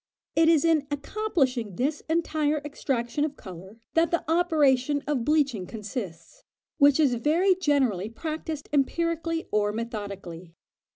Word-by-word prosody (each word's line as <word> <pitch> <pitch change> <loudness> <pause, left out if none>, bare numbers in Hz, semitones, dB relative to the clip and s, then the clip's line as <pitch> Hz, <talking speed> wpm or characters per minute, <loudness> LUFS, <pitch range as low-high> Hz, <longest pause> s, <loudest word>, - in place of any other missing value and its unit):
It 325 0 +5
is 325 -2 +4
in 315 -3 +2
accomplishing 280 - -1
this 285 - -1
entire 310 -2 +1
extraction 275 -1 -2
of 295 -1 -3
colour 190 +2 -11 0.2
that 330 +1 +3
the 340 - -1
operation 295 -5 +2
of 280 -5 -1
bleaching 275 - +1
consists, 210 - -7 0.4
which 285 0 +5
is 285 -5 +4
very 320 +10 +3
generally 270 - +1
practised 310 +3 -5
empirically 330 +3 0
or 205 -1 +1
methodically. 200 -7 -6
285 Hz, 125 wpm, -26 LUFS, 230-320 Hz, 0.4 s, It